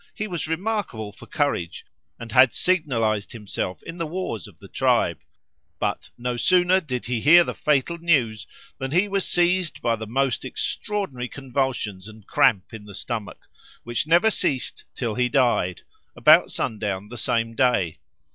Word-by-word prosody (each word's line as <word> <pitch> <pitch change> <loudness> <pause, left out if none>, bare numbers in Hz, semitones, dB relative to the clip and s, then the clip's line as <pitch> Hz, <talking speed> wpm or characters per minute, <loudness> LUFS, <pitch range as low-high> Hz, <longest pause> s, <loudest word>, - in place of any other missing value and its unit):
He 215 - -3
was 175 -5 -4
remarkable 165 - -2
for - - -15
courage, 115 - -2 0.3
and 115 -1 -8
had 130 +1 +6
signalised 115 - 0
himself 105 -4 -4
in 165 +1 -8
the 165 - -2
wars 155 - -4
of - - -17
the - - -14
tribe," - - +1 0.6
but - - -2
"no 120 0 -3
sooner 180 +5 +4
did 130 -7 -4
he 120 -2 -2
hear 170 +6 +7
the - - -4
fatal 150 +3 0
news 130 - +1 0.3
than 135 - -3
he 180 +8 +2
was 195 -1 -1
seized 175 -1 +1
by 115 -1 +1
the 110 0 -7
most 135 +2 0
extraordinary 135 - -3
convulsions 130 -8 -3
and 110 -2 -14
cramp 100 +1 +2
in 105 -2 -9
the 100 -2 -10
stomach, 110 -1 -6 0.4
which 120 +5 -2
never 175 +7 +5
ceased 140 -11 -1
till 115 -4 -2
he 125 +2 +1
died, 120 - +1 0.3
about - - +6
sundown 105 -2 -3
the 120 - -8
same 115 0 0
day. 115 -9 +1
125 Hz, 160 wpm, -24 LUFS, 110-170 Hz, 0.6 s, hear